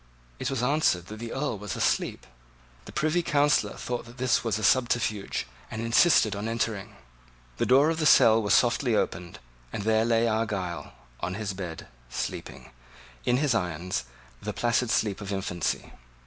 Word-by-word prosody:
It - - -2
was 135 -3 -2
answered 125 - +2
that 110 0 -8
the 115 0 -6
Earl 135 -6 -2
was 105 -2 -5
asleep. - - 0 0.6
The - - -9
Privy 155 +3 +1
Councillor 145 -3 +2
thought 120 -1 -4
that 120 +2 -14
this 130 -1 +1
was 115 -4 0
a 110 - -5
subterfuge, 115 -2 +1 0.2
and 110 - -6
insisted 115 - +4
on 105 +2 -4
entering. 115 -3 -2 0.6
The - - 0
door 140 +5 +5
of 165 - -3
the 155 - +3
cell 115 -5 +6
was 105 - +3
softly 120 -1 +2
opened; 85 -4 -2 0.3
and - - -4
there 110 +1 +3
lay 115 0 +2
Argyle, 105 -6 -2 0.3
on 90 +1 -3
the 105 0 -3
bed, 90 -4 -7 0.2
sleeping, 65 +1 -5 0.5
in 125 - +3
his 145 -1 +2
irons, 90 - -2 0.4
the - - -4
placid 120 0 +1
sleep 105 -3 0
of 100 0 -5
infancy. 90 -4 -2
115 Hz, 165 wpm, -27 LUFS, 100-125 Hz, 0.6 s, cell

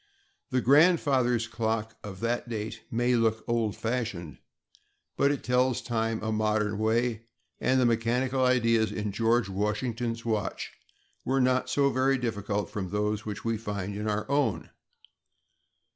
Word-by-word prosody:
The 130 - +1
"grandfather's 135 -5 +4
clock" 110 -1 -2
of 95 -2 -8
that 120 +1 -1
date 110 -1 -4
may 120 +2 +1
look 115 -2 +1
old 115 -3 0
fashioned, 110 - -3 0.8
but 140 - +3
it 145 -1 -2
tells 125 +1 +2
time 115 -2 -2
a 110 - -1
modern 105 -1 0
way, 115 +1 0 0.3
and 130 0 +2
the 125 - +3
mechanical 125 +3 +1
ideas 115 -3 +3
in 105 -1 -3
George 115 +3 +2
Washington's 115 +4 -2
watch 110 -4 -2 0.5
were 135 +2 +1
not 130 0 +2
so 140 -1 +2
very 135 +1 +2
different 105 -4 -2
from 95 -3 -4
those 105 +1 -1
which 105 +1 -5
we 115 -1 0
find 100 -2 -4
in 105 +1 -2
our 105 0 -2
own. 140 0 0
115 Hz, 145 wpm, -28 LUFS, 105-125 Hz, 0.8 s, grandfather's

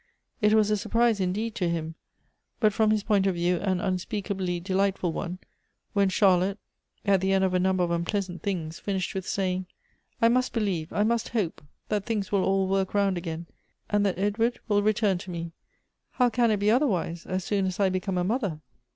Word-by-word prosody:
It 210 0 +4
was 215 -1 +3
a 210 - +3
surprise, 230 +1 +2
indeed, 205 +5 -1
to 185 -6 -1
him, 165 -1 -3 0.7
but 215 -3 +3
from 220 +1 +3
his 215 -1 +2
point 200 -3 +2
of 190 - +1
view 175 +1 +1
an 185 0 0
unspeakably 185 -1 -2
delightful 190 -1 0
one, 180 +3 -4 0.6
when 200 -2 +3
Charlotte, 190 0 +3 0.5
at 195 -2 +3
the 190 0 +1
end 190 0 +3
of 190 -1 +1
a 180 - +3
number 185 0 +2
of 170 - -1
unpleasant 175 +1 -2
things, 165 -5 -3
finished 190 -3 -2
with 190 -1 -4
saying: 185 -1 -1 0.3
" - - -44
I 230 - +5
must 255 +2 +2
believe, 190 -8 -1
I 205 - +1
must 230 +1 0
hope, 210 -8 -2 0.3
that 210 -2 0
things 210 -4 -2
will 200 -2 +2
all 195 0 +2
work 195 +1 0
round 200 -2 +2
again, 170 -1 -5 0.5
and 205 0 +3
that 185 - -1
Edward 220 +5 0
will 205 -2 +3
return 205 -3 +2
to 185 - -9
me. 170 -1 -5 0.6
How 250 -2 +3
can 235 0 +3
it 215 - +2
be 205 +1 +2
otherwise, 185 - 0
as 185 0 -2
soon 195 -1 0
as 185 - -4
I 195 -2 +4
become 185 0 -2
a 180 - +1
mother?" 200 - -1
195 Hz, 205 wpm, -27 LUFS, 180-210 Hz, 0.7 s, I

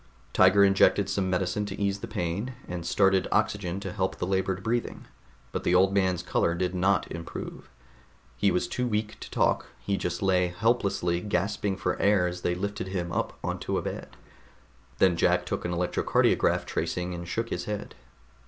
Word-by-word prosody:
Tiger 95 +2 +6
injected 95 0 +4
some 95 -2 0
medicine 95 +3 0
to 100 0 -6
ease 100 -1 0
the - - -6
pain, 100 +9 -3
and 85 -1 -5
started 95 0 +3
oxygen 95 -3 0
to - - -4
help 95 -3 -1
the - - -3
labored 95 0 -1
breathing, 120 +1 -2 0.5
but - - -3
the 90 - +2
old 95 +2 +4
man's 95 -3 +1
color 85 - +1
did 90 +1 -1
not 95 +1 +1
improve. 85 0 -7 0.7
He 100 - +2
was 90 - 0
too 125 0 -2
weak 105 -1 -2
to - - -8
talk; - - +1
he 100 -1 -1
just 90 +1 -3
lay 90 -2 +3
helplessly 90 -3 0
gasping 100 0 -1
for - - -2
air 100 -3 +4
as 90 0 -3
they 90 - 0
lifted 100 +1 -3
him 90 -2 -3
up - - -2
onto - - -2
a - - -2
bed. - - -6 0.8
Then 95 -2 +4
Jack - - +2
took - - -3
an 85 - -1
electrocardiograph 90 +1 +2
tracing 90 0 -2
and 85 0 -6
shook 115 +5 -2
his 90 - -3
head. 105 -1 -5
95 Hz, 180 wpm, -27 LUFS, 90-100 Hz, 0.8 s, Tiger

